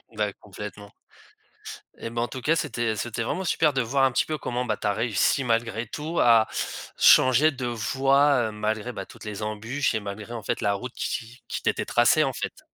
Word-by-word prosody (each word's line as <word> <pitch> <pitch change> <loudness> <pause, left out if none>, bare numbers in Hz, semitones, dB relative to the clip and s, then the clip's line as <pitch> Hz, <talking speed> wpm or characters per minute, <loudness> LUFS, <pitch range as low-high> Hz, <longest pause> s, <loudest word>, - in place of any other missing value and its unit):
Bah, - - -1
complètement. - - -10 1.1
Et 115 - -6
bah, 115 0 -3
en 120 - 0
tout 130 - -7
cas, 160 +5 +2
c'était 120 -7 -1
c'était 115 +2 -3
vraiment 190 +10 -2
super 155 -4 +2
de 135 - +1
voir 135 +3 +2
un 130 - +2
petit - - +2
peu 155 -1 -3
comment 125 -2 -3
bah, 105 -3 -1
tu - - -2
as 100 - +2
réussi 115 +4 +1
malgré 115 -1 -1
tout, 155 +7 -4
à 115 -2 +5 0.5
changer 130 +5 +6
de 130 -2 -5
voie, 135 +2 +2
heu, - - -7
malgré 110 +3 -3
bah, 95 - -6
toutes - - -14
les 105 0 -6
embûches, 115 +6 -1
et 110 - 0
malgré, 105 +3 -7
en 115 - -5
fait, - - -2
la 100 -2 +2
route 125 +5 -5
qui 120 +1 -5
qui - - -3
t'était - - 0
tracée, 125 +6 +4
en 135 - 0
fait. - - -6
120 Hz, 210 wpm, -25 LUFS, 110-135 Hz, 1.1 s, changer